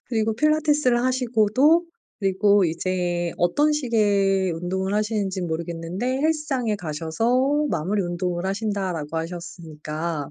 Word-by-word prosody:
그리고 225 -2 0
필라테스를 295 -3 +2
하시고도 255 +5 +3 0.3
그리고 200 0 +3
이제 175 0 -1
어떤 290 - +2
식의 200 - +2
운동을 190 +4 -2
하시는지는 205 -4 -1
모르겠는데 170 +9 -3
"헬스장에 295 -8 0
가셔서 225 - 0
마무리 190 +6 -1
운동을 175 0 -2
하신다."라고 190 -6 -2
하셨으니까 160 -2 -5
195 Hz, 330 characters per minute, -23 LUFS, 175-240 Hz, 0.3 s, 하시고도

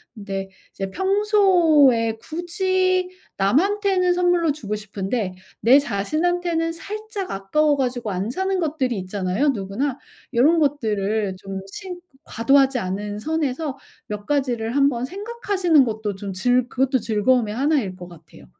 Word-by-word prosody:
근데 195 -2 -5 0.2
이제 195 -1 -5
평소에 350 - +3
굳이 370 +2 0 0.3
남한테는 365 - +2
선물로 355 -2 +2
주고 210 -8 -4
싶은데 205 -1 -3 0.3
내 255 +5 +7
자신한테는 330 - -1
살짝 415 +2 -6
아까워 290 +10 +1
가지고 245 -4 -2
안 190 +4 -2
사는 380 +4 -1
것들이 285 - -1
있잖아요, 190 +7 -1
누구나. 240 +4 -2 0.4
요런 295 +8 +4
것들을 215 -8 0
좀 195 0 -6
신 365 - -7 0.3
과도하지 270 +3 +3
않은 205 +1 -4
선에서 300 0 -2 0.3
몇 210 -1 -6
가지를 245 -5 -1
한번 275 -4 +2
생각하시는 385 - +1
것도 215 -3 -3
좀 195 0 -6
즐 245 +6 +2
그것도 265 +1 +1
즐거움의 220 0 +1
1 290 +4 +2
일 190 -4 -5
것 180 -1 -10
같아요. 160 - -16
265 Hz, 295 characters per minute, -22 LUFS, 210-345 Hz, 0.4 s, 내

